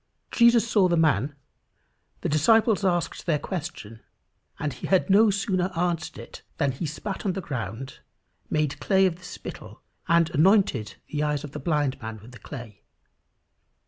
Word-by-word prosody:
Jesus 235 -1 +5
saw 205 -4 +4
the 170 -1 +1
man, 145 -3 +2 0.9
the - - -1
disciples 215 +7 +3
asked 175 -2 -1
their 155 -3 +3
question, 150 - -6 0.6
and 150 -2 -3
he - - -7
had 190 +1 +2
no 215 +3 +6
sooner 195 -2 0
answered 170 -2 -1
it, - - -10 0.2
than 140 -3 +1
"he 135 +6 -4
spat 190 +6 -5
on 195 - 0
the 195 - -3
ground, 125 - -6 0.5
made 150 -2 0
clay 190 -1 +3
of 175 -3 0
the 185 - -19
spittle, - - -9 0.2
and 170 -1 +3
anointed 155 - +3 0.2
the 150 - -1
eyes 150 -1 0
of 145 - -7
the - - -6
blind 145 -3 0
man 110 -1 -6
with 110 +4 -14
the 120 - -13
clay." 120 -7 -9
160 Hz, 165 wpm, -26 LUFS, 140-190 Hz, 0.9 s, no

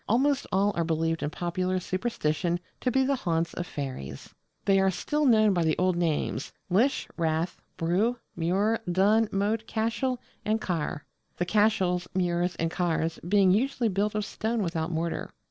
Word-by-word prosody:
Almost 275 +5 +2
all 200 +2 +3
are 170 - +1
believed 165 0 0
in 145 - -1
popular 180 +3 -1
superstition 180 -3 -1 0.2
to 255 - 0
be 265 +2 +3
the 275 0 +1
haunts 170 -6 -1
of 175 - -4
fairies. 130 - -6 0.3
They 195 -1 +4
are 190 0 +4
still 295 - 0
known 215 -4 +5
by 175 -2 +1
the 160 -1 +1
old 185 0 +2
names 165 -3 -1 0.2
lis, 235 +10 +3
rath, 165 +1 -1 0.2
brugh, 195 +9 +1 0.2
múr, 195 +7 +1
dún, 205 +5 +3
moat, 210 +3 0
cashel, 235 +3 -1 0.2
and 215 +1 +1
caher: 165 -5 -2 0.4
the 175 - 0
cashels, 190 -3 +2
múrs, 175 -1 +1
and 165 0 -1
cahers 165 -2 -1
being 195 -2 +5
usually 235 +3 +1
built 205 +2 0
of 210 -1 0
stone 220 +1 -2
without 165 -2 -2
mortar. 165 0 -2
185 Hz, 165 wpm, -28 LUFS, 170-220 Hz, 0.4 s, known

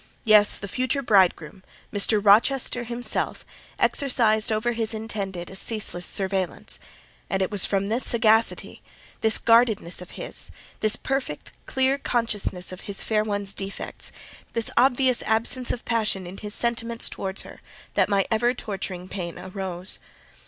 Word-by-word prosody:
Yes; 210 -2 +5
the 200 - -6
future 255 +6 -1
bridegroom, 190 -5 +2 0.3
Mr. 205 +1 +3
Rochester 240 +4 +4
himself, 240 +1 -2 0.3
exercised 235 -5 +2
over 220 +2 +1
his 225 -1 -1
intended 200 -5 -4
a - - -8
ceaseless 195 -4 -1
surveillance; 190 -2 -2 0.5
and 190 - 0
it 190 - -3
was 205 -3 +1
from 195 0 0
this 230 +5 +1
sagacity—this 225 -1 +1
guardedness 225 -7 +3
of 180 - -10
his—this 215 0 -3
perfect, 265 - -3 0.2
clear 265 +1 +1
consciousness 210 -8 -1
of 185 - -9
his 195 - -1
fair 215 -1 +1
one's 205 -2 -2
defects—this 200 +3 -4
obvious 255 0 +4
absence 235 +3 +2
of 245 - -3
passion 215 -5 0
in 180 +2 -8
his 210 0 -1
sentiments 235 -1 0
towards 190 0 -4
her, - - -13 0.3
that - - +2
my 200 -1 +2
ever 240 +3 +2
torturing 190 -5 -5
pain 175 -3 -5
arose. 185 0 -2
215 Hz, 135 wpm, -25 LUFS, 195-235 Hz, 0.5 s, Yes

